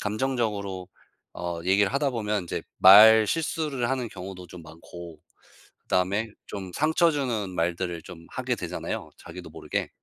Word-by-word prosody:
감정적으로 105 -5 -2 0.4
어 85 -1 -5
얘기를 100 +4 +2
하다 140 0 +1
보면 105 -5 -2
인제 85 - -5 0.2
말 110 +3 +9
실수를 150 -3 -2
하는 125 -3 -2
경우도 90 -1 -9
좀 85 -1 -12
많고 80 +1 -12 0.6
그 - - -47
다음에 100 +5 +1 0.2
좀 95 -3 -7
상처 160 - +3
주는 120 -10 -2
말들을 85 -1 -2
좀 85 -2 -12
하게 - - -3
되잖아요 - - -5
자기도 - - -10
모르게. - - -4
100 Hz, 310 characters per minute, -26 LUFS, 90-120 Hz, 0.6 s, 말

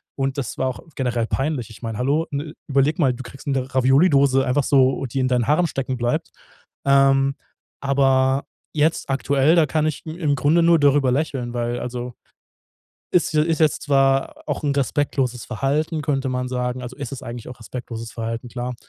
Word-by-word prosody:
und 135 0 -2
das 135 - -4
war 130 - 0
auch 130 - -6 0.2
generell 120 -3 -1
peinlich. 135 -4 -2
Ich 110 - -13
meine, 115 -2 -4
hallo? 145 +6 +1
N 145 +2 -4
überlege 140 +3 +2
mal, 135 -4 +3
du 130 +2 -8
kriegst 135 +3 -12
'ne 135 -1 -1
Ravioli-Dose 135 0 +4
einfach 135 +2 +1
so, 135 -1 +3
die 130 +3 -3
in 130 0 +1
deinen 125 -2 +1
Haaren 155 +5 +3
stecken 135 -3 -3
bleibt. 120 0 -1 0.5
Ähm, 135 0 +4 0.5
aber 135 -1 +2 0.3
jetzt 155 -1 +1
aktuell, 135 +4 +2
da 165 -2 +5
kann 155 +2 0
ich 155 - -4
i 155 - -4
im 150 -4 +1
Grunde 150 +5 +3
nur 170 0 +5
darüber 140 -2 +4
lächeln, 130 -4 -2
weil 120 0 -2
also, 125 0 -5 1.0
ist 175 -3 +2
je 150 - +4
ist 165 0 0
jetzt 155 -2 +2
zwar 135 -1 +1
auch - - -3
'n 145 -1 +1
respektloses 135 -3 0
Verhalten, 145 +6 -1
könnte 135 -2 0
man 125 0 -2
sagen. 125 0 -2
Also, 125 +1 -7
es 140 -3 -6
ist 135 - -7
eigentlich 120 0 -7
auch 125 - -9
respektloses 115 -1 -7
Verhalten, 115 +1 -4
klar. 125 0 -4
135 Hz, 185 wpm, -22 LUFS, 125-145 Hz, 1.0 s, da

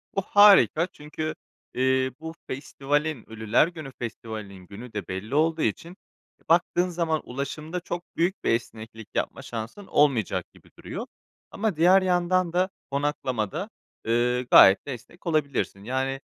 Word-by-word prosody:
Bu 195 - +1
harika 195 -4 +6
çünkü, 155 -1 -6 0.4
eee, 130 0 +1
bu 160 0 -7
festivalin, 145 0 -2
Ölüler 110 +5 +2
Günü 160 -5 -8
Festivali'nin 105 -5 -7
günü 110 +5 -10
de 105 - -5
belli 95 +7 -5
olduğu 160 +1 +2
için 165 - -2 0.5
baktığın 175 +1 +3
zaman 165 -3 -1
ulaşımda 150 +6 -5
çok 175 0 -5
büyük 180 +4 0
bir - - 0
esneklik 115 -1 -4
yapma - - -2
şansın 120 - -7
olmayacak 140 -8 +2
gibi - - -20
duruyor. - - -6 0.5
Ama 215 -3 -1
diğer 180 +4 +6
yandan 180 -1 +1
da 185 +2 +2 0.2
konaklamada, 140 - -2 0.4
ııı, 120 +2 +1
gayet 95 +1 +8
de 140 - -3
esnek 170 +9 -12
olabilirsin. 140 -10 -1
Yani, 130 +3 -2
145 Hz, 135 wpm, -26 LUFS, 115-170 Hz, 0.5 s, gayet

